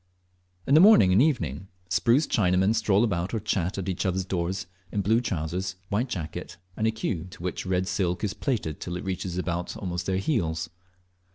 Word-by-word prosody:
In 140 - +1
the 155 - +8
morning 180 - +7
and 95 +5 +5
evening, 95 - 0 0.2
spruce 120 - +3
Chinamen 95 0 +2
stroll 105 -1 +3
about 95 -2 -1
or - - 0
chat 100 -3 -1
at 95 - -3
each 95 -2 -1
other's 95 -1 0
doors, 90 -1 -2 0.3
in 105 - 0
blue 110 +5 +3
trousers, 95 -3 -3
white 115 +6 0
jacket, 80 -8 -5 0.2
and 110 - 0
a - - +3
queue 110 -6 -2
into 90 0 -11
which 90 +1 -3
red 95 0 0
silk 90 0 -1
is 105 - 0
plaited 105 - -2
till 90 +1 -4
it - - -6
reaches 95 -1 -3
almost 90 0 -3
to 95 - 0
their 95 - +1
heels. 80 - -1
95 Hz, 190 wpm, -26 LUFS, 90-110 Hz, 0.3 s, the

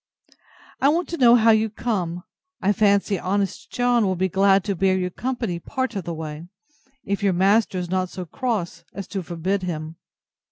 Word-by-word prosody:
I 275 - +5
want 340 +4 0
to 335 - -3
know 240 -4 +7
how 225 -1 +5
you 220 0 +3
come. 185 -6 -3 0.4
I 200 +2 +2
fancy 200 -1 +2
honest 195 0 -2
John 245 -1 +2
will 190 -2 +1
be 190 +1 0
glad 195 +1 +3
to 200 0 -2
bear 190 +1 +2
you 180 -1 -2
company 235 -6 -3
part 260 +6 -3
of 195 -4 -4
the 170 - -3
way, 155 +1 -7 0.6
if 200 0 -2
your 200 -2 +2
master 195 +2 +2
is 180 -1 -4
not 185 -1 0
so 185 -1 -6
cross 215 -2 -3
as 195 - -5
to 195 - -3
forbid 180 +3 -2
him. 160 -2 -5
195 Hz, 190 wpm, -23 LUFS, 180-220 Hz, 0.6 s, know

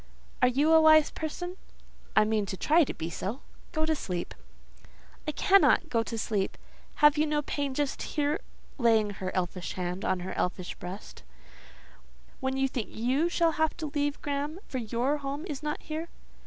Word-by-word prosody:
"Are - - +6
you 285 +6 +3
a 320 - +8
wise 310 -1 +6
person?" 355 +4 -5 0.6
"I 215 - +6
mean 215 -2 0
to 190 - -4
try 320 - +4
to - - -3
be 165 +1 -4
so. 215 +11 -4 0.3
Go 315 -2 0
to 315 0 +1
sleep." 180 - -4 0.9
"I - - +1
cannot 380 -1 +4
go 230 -5 +2
to 225 0 -4
sleep. 210 -3 -1 0.5
Have 295 0 +6
you 310 - +3
no 295 0 0
pain 280 -2 -2
just 285 -1 -1
here" 295 0 0 0.4
(laying 225 -3 +4
her 190 -2 -4
elfish 180 -1 -2
hand 180 +1 -3
on 185 -1 0
her 185 - -5
elfish 180 0 -2
breast,) 185 +3 -9 1.2
"when 265 0 -1
you 270 0 +2
think 250 -4 -4
you 260 +9 +1
shall 335 -1 +3
have 315 - +2
to 310 -4 -4
leave 290 -1 0
Graham; 290 +2 -2
for 260 - -3
your 240 +5 0
home 280 +1 -4
is 295 -4 -5
not 300 0 -2
here?" 320 +2 -5
275 Hz, 180 wpm, -29 LUFS, 215-305 Hz, 1.2 s, a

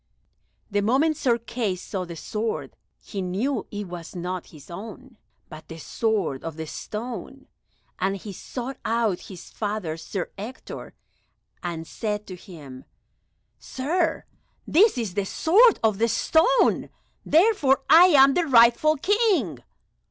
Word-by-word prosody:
The 205 0 +1
moment 270 +9 +2
Sir 240 -4 +1
Kay 230 -4 -3
saw 185 +1 -5
the 170 -1 -8
sword 215 +6 -4 0.3
he 200 - -5
knew 200 +10 -2
it 205 -1 -5
was 175 -2 -9
not 180 0 -4
his 150 0 -15
own, 225 +6 -10 0.3
but 155 -1 -12
the 165 - -9
sword 195 - -2
of 165 -1 -6
the 160 - -4
stone, 240 - -7 0.5
and 195 +1 0
he 200 +1 -8
sought 255 +7 -6
out 225 -5 0
his 185 -3 -11
father 205 -7 -3
Sir 180 +2 -5
Ector, 230 +6 -8 0.7
and 170 -2 -5
said 210 +5 -4
to 185 - -8
him, 150 -8 -12 0.7
"Sir, 320 +5 -1 0.4
this 395 - +4
is 220 -7 -3
the 200 +1 0
sword 415 - +4
of 215 -3 +2
the 230 - +3
stone, 330 - +2 0.3
therefore 305 - +3
I 335 +3 +8
am 275 -6 +6
the 345 +1 +1
rightful 245 +5 +5
King." 370 - +1
220 Hz, 135 wpm, -24 LUFS, 180-270 Hz, 0.7 s, I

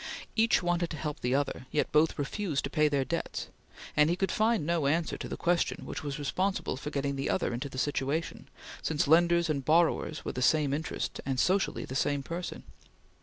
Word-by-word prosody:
Each 225 -3 +3
wanted 175 -1 +1
to 155 - -5
help 150 -1 -4
the 125 +2 0
other, 140 -2 -2
yet 150 - 0
both 155 +1 +3
refused 150 +1 -2
to 140 - -4
pay 150 +1 +3
their 140 -2 +1
debts, - - -3 0.5
and 150 +1 +5
he 170 - +2
could 190 +1 0
find 220 -6 +2
no 165 -3 +1
answer 160 +3 +1
to - - -6
the - - -5
question 175 0 0
which - - -5
was 145 0 -3
responsible 185 +6 -1
for 135 +3 -5
getting 140 -1 -2
the 135 - -2
other 180 - 0
into 125 +4 -3
the 130 - -9
situation, 145 +3 -2 0.3
since 155 -2 0
lenders 170 +2 +5
and 145 -3 -1
borrowers 160 0 +2
were - - -2
the 125 - -4
same 145 +1 +3
interest 155 +2 -3
and 135 -2 -1
socially 190 +6 +1
the - - -7
same 140 +1 0
person. 170 +4 -5
150 Hz, 205 wpm, -30 LUFS, 140-170 Hz, 0.5 s, and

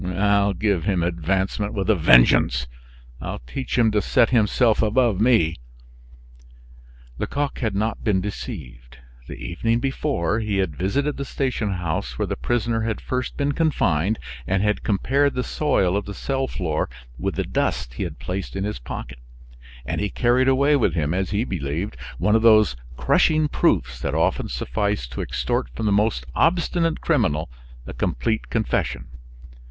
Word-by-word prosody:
I'll 100 +2 +2
give 100 -3 0
him 95 -4 +1
advancement 95 +5 -1
with 100 -2 -1
a 110 - +5
vengeance! 60 -4 +5 0.6
I'll - - -4
teach 130 - -4
him 115 -2 +4
to 105 -1 +2
set 115 - +3
himself 115 0 +3
above 110 -2 +2
me!" 110 -9 +3 1.6
Lecoq 145 0 -2
had 110 -5 -1
not 110 +2 -1
been 100 -3 +2
deceived. 65 - -7 0.3
The - - -7
evening 115 +7 -1
before, 135 - -1
he 105 -3 -1
had 95 -6 -1
visited 140 - -1
the 140 - -3
station 125 -7 -1
house 80 -9 -3
where - - 0
the - - -3
prisoner 120 -1 -1
had 110 -1 -2
first 125 0 -3
been 145 0 +1
confined, 110 - +1 0.3
and 95 +1 +1
had 105 0 +1
compared 135 +7 +1
the 125 - 0
soil 110 -14 +1
of 100 - -1
the 100 - -7
cell 135 +3 -1
floor 80 -9 -2 0.3
with - - -2
the - - 0
dust - - -2
he - - -6
had 85 -5 -4
placed 95 +2 -5
in 95 - -2
his 105 -8 -3
pocket; - - -7 0.7
and - - -2
he 105 - -1
carried 125 +3 +2
away 140 +3 +4
with 105 - +1
him, 75 -1 0
as 95 0 -1
he 105 +3 0
believed, 85 - -3 0.2
one 105 - +2
of 110 - +3
those 110 - +5 0.2
crushing 155 -1 +3
proofs 60 - +1
that - - -2
often - - +1
suffice 100 +3 -1
to 65 +1 -6
extort - - -2
from 110 - -3
the 105 - +2
most 105 +2 +1
obstinate 165 -1 +1
criminal 80 - +1 0.3
a - - -7
complete 110 -1 -1
confession. 65 - -1
105 Hz, 165 wpm, -23 LUFS, 85-120 Hz, 1.6 s, a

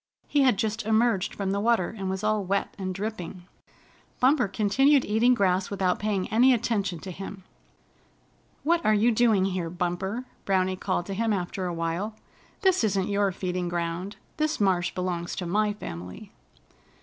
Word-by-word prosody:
He 290 - +2
had 255 -6 +4
just 220 +1 -1
emerged 220 -3 +2
from 195 -1 -2
the 200 - 0
water, 225 -3 +1
and 195 -3 -4
was 190 +1 -3
all 215 -1 +1
wet 195 +2 -1
and 185 -1 -2
dripping. 195 -3 -5 0.8
Bumper 255 -2 +4
continued 260 +8 +3
eating 230 +4 +3
grass 185 -3 +1
without 190 -3 0
paying 205 -3 -1
any 250 +3 +5
attention 205 -6 -1
to 190 - -6
him. 195 +1 -8 1.2
"What 335 +2 +2
are 215 - +4
you 225 +4 +4
doing 220 -4 +3
here, 185 -3 -2
Bumper?" 180 +7 -3 0.2
Browny 185 -1 +1
called 185 -2 -2
to 195 - -5
him 225 +3 0
after 185 -1 -2
a 175 - -3
while. 165 +6 -2 0.5
"This 380 - +3
isn't 195 -3 +1
your 200 -1 +2
feeding 180 -1 -3
ground. 175 +3 -3 0.2
This 310 0 0
marsh 185 -3 +2
belongs 180 -2 -2
to 180 - -4
my 210 +4 +1
family." 90 - -8
195 Hz, 165 wpm, -26 LUFS, 185-220 Hz, 1.2 s, any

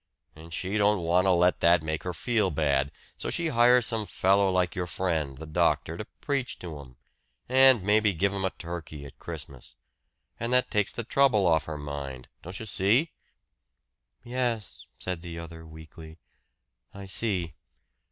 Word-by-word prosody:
And 80 +2 -13
she 95 +5 -2
don't 105 -3 +3
want 90 +3 +3
to - - +5
let 90 0 +3
that 85 -1 +4
make 80 0 -2
her 90 - -3
feel 105 +3 0
bad, 70 -4 +1 0.3
so - - -4
she 170 -1 -1
hires 125 -2 +5
some 115 -3 -1
fellow 100 +1 +3
like 90 -1 +1
your 90 -1 -3
friend, 80 -6 -2
the 80 - -8
doctor, 80 +1 +1
to 105 - -6 0.2
preach 140 -3 -2
to 80 -5 -8
'em 65 -3 -15 0.5
and 130 -4 +6
maybe 105 +1 +3
give 100 +4 +1
'em 100 -1 -3
a 95 - +2
turkey 85 -5 -8
at 70 - -13
Christmas. 75 -6 -9 0.6
And 115 +2 -2
that 125 0 +3
takes 105 -1 +1
the 120 - -5
trouble 120 -4 +3
off 80 -2 +3
her 80 -1 -5
mind. 70 -3 -6
Don't 90 +3 -8
you 110 - -6
see?" 110 - +2 1.1
"Yes," 120 -4 -3
said 90 -3 -4
the 85 -1 -7
other 80 -1 -9
weakly. 80 0 -12 0.8
"I 100 0 -8
see." 95 -4 0
90 Hz, 170 wpm, -27 LUFS, 80-105 Hz, 1.1 s, and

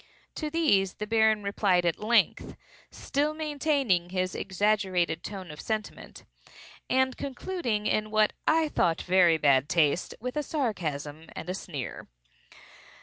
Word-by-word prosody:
To 305 - -4
these 290 - +2
the 210 - -4
Baron 220 -1 +3
replied 200 -3 +1
at 170 - 0
length 230 +2 +1 0.3
(still 295 +2 -2
maintaining 285 - 0
his 185 -1 -1
exaggerated 190 -4 0
tone 190 -5 -7
of 150 - -9
sentiment) 215 -2 -5 0.7
and 260 0 +2
concluding, 260 - -3
in 215 0 0
what 215 0 +2
I 320 0 +3
thought 170 - +1
very 180 -3 +4
bad 140 -2 +3
taste, 160 +1 +1
with 250 +4 -5
a - - +2
sarcasm 160 - -3
and 180 - -5
a - - -2
sneer. 150 -8 -6
205 Hz, 135 wpm, -28 LUFS, 175-255 Hz, 0.7 s, very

